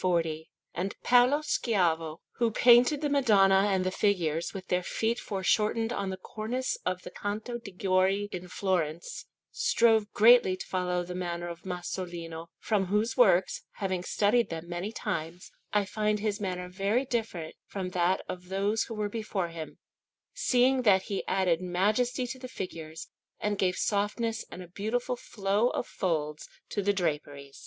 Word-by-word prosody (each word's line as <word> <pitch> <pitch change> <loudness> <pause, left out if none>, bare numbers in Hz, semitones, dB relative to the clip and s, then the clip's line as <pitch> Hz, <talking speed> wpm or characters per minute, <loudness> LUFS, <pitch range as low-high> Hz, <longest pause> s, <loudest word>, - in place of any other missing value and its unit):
And 190 +3 -3
Paolo 250 +5 +5
Schiavo 170 - 0 0.2
who 235 -1 +2
painted 245 +6 +5
the 295 - 0
Madonna 200 -8 +5
and 190 -2 +1
the 185 - 0
figures 170 -6 0
with 185 -2 -8
their 180 0 +2
feet 225 +6 -1
foreshortened 215 +4 0
on 195 - -2
the 190 - -4
cornice 235 +7 -3
on 180 0 0
the - - -8
Canto 215 +4 -4
de' 225 - -9
Gori 190 +1 +1
in 180 0 -6
Florence 175 -4 -2 0.2
strove 220 -3 +3
greatly 220 -4 +6
to - - -7
follow 180 -1 -1
the 180 +1 -6
manner 175 -1 -3
of 170 +1 -9
Masolino, 175 -2 -5
from 200 -4 0
whose 210 +4 +1
works, 190 -7 +4
having 190 -3 -2
studied 215 +5 +2
them 165 0 -6
many 175 +4 -4
times, 175 -5 -4 0.2
I 205 -1 +2
find 210 +1 0
his 210 0 -2
manner 180 -2 -3
very 200 +8 0
different 220 -10 -3
from 190 -2 -4
that 180 +1 +1
of 180 0 -7
those 200 +3 0
who 225 - -7
were 210 -1 -1
before 205 -4 -3
him, 165 -2 -8 0.6
seeing 260 - +3
that 195 -5 +4
he 195 - -1
added 185 -3 +2
majesty 210 +8 +1
to 255 +2 -6
the 255 - -7
figures, 165 -8 -7 0.3
and 210 0 0
gave 185 -1 +2
softness 220 +2 -1
and 180 - -8
a - - -12
beautiful 220 +7 -2
flow 205 0 0
of - - -2
folds 155 -5 -2 0.2
to 205 - -1
the 200 +1 +2
draperies. 145 -6 -3
195 Hz, 160 wpm, -29 LUFS, 180-225 Hz, 0.6 s, greatly